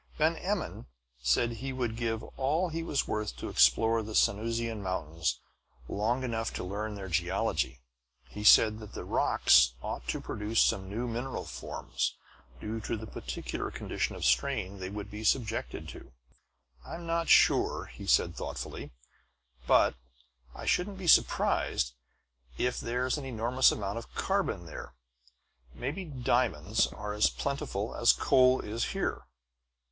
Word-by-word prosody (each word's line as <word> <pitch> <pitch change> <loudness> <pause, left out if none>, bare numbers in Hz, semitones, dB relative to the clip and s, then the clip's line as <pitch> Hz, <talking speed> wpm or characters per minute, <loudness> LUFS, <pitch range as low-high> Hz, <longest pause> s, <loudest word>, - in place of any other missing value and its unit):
Van 160 +2 +3
Emmon 190 - -3 0.3
said 65 - +2
he 130 +4 -5
would 125 -4 -2
give 115 -1 -2
all 155 +7 +1
he 165 +1 -3
was 150 -4 -1
worth 105 - -3
to - - -5
explore 110 - +4
the 110 0 -6
Sanusian 115 +1 +1
mountains 80 -8 -2 0.5
long 115 - 0
enough 115 -3 -2
to - - -5
learn 105 +3 -4
their 95 -1 -6
geology. 85 -7 -1 0.5
He 105 +12 -8
said 110 0 +7
that 105 -2 -10
the - - -5
rocks 65 -3 +4
ought - - -5
to 65 - -1
produce 105 +2 -2
some 95 0 +2
new 115 +5 -3
mineral 120 +3 -4
forms, - - -3 0.4
due 110 +1 -4
to 110 - -3
the 110 - -7
peculiar 105 - -5
condition - - -3
of - - -4
strain 90 +10 +1
they 95 0 -4
would 105 +1 -7
be 105 +1 -7
subjected 110 0 0
to. - - -11 0.7
"I'm 170 - -8
not 165 0 -1
sure," - - +4 0.2
said - - +4
he - - -15
thoughtfully, - - -6 0.8
"but - - +5 0.6
I - - -8
shouldn't 195 +2 0
be 190 - -7
surprised - - +3 0.6
if 125 0 0
there's 125 +4 -1
an 140 - -7
enormous 125 +1 +3
amount 100 +2 -3
of 115 - -14
carbon - - -1
there. - - -9 0.8
Maybe 150 +10 -4
diamonds 130 -6 +1
are 105 0 -6
as 105 +1 +4
plentiful 120 -7 -3
as 120 - +5
coal 130 -1 +4
is 115 +2 -3
here." - - -3
110 Hz, 145 wpm, -30 LUFS, 100-130 Hz, 0.8 s, said